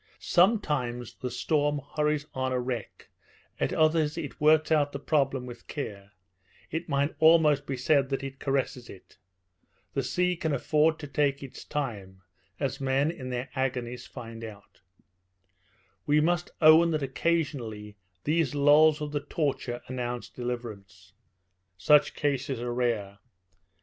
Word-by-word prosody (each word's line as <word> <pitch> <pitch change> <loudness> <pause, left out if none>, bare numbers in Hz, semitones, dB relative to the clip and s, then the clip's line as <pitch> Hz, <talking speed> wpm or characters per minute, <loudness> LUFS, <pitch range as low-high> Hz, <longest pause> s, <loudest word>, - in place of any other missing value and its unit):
Sometimes 145 - +1
the 125 +1 -5
storm 145 +3 0 0.2
hurries 150 -1 +1
on 130 0 -2
a 130 - 0
wreck, 125 -4 -5 0.5
at - - 0
others 155 0 +2
it 150 -4 -6
works 155 +1 +4
out 145 -2 +2
the - - -3
problem 135 -3 0
with 120 -1 -11
care; 105 -8 -6 0.6
it 160 +1 -4
might 140 +1 +1
almost 155 -3 +5
be 135 - -3
said 135 +1 +2
that 135 0 -2
it 135 0 -7
caresses 135 -3 -2
it. 95 - -14 0.7
The - - 0
sea 180 0 0
can 160 -3 -1
afford 155 +4 +2
to 150 - -8
take 140 -1 0
its 135 - -9
time, 100 -10 -5 0.4
as 135 0 -2
men 135 +3 +1
in 130 -6 -8
their 125 +2 -4
agonies 125 -2 -3
find 115 -1 -9
out. 105 -2 -11 1.3
We 150 +1 +4
must 175 +2 +1
own 160 +2 +8
that 155 -3 -1
occasionally 130 -8 -2 0.3
these 155 -2 +1
lulls 150 +2 +5
of 150 -1 -4
the 145 - -1
torture 135 -5 -2
announce 125 -1 -4
deliverance. 100 -6 -7 0.6
Such 150 +9 +4
cases 140 -3 -1
are 120 0 -3
rare. 110 -5 -1
135 Hz, 140 wpm, -28 LUFS, 120-150 Hz, 1.3 s, own